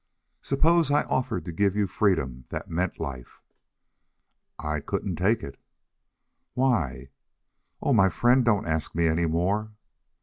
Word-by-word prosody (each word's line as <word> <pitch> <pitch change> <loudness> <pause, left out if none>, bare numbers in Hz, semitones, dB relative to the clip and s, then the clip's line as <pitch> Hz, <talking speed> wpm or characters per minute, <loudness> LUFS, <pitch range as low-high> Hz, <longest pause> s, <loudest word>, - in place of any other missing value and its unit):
"Suppose 165 +4 +2
I 145 - +3
offered 130 -3 -2
to 85 - -5
give 100 +3 +1
you 105 -1 +2
freedom 80 - 0
that - - -6
meant 90 +2 -2
life?" 65 -3 -7 1.2
"I 75 0 -2
couldn't 85 +4 -3
take 100 +6 +1
it." 70 -1 -8 1.0
"Why?" 80 - 0 0.7
"Oh, 140 - +2
my 95 -4 +5
friend, 125 +5 +3
don't 105 -4 +2
ask 80 -1 -2
me 85 0 +2
any 80 +1 +2
more." 100 +7 -1
95 Hz, 135 wpm, -26 LUFS, 80-115 Hz, 1.2 s, my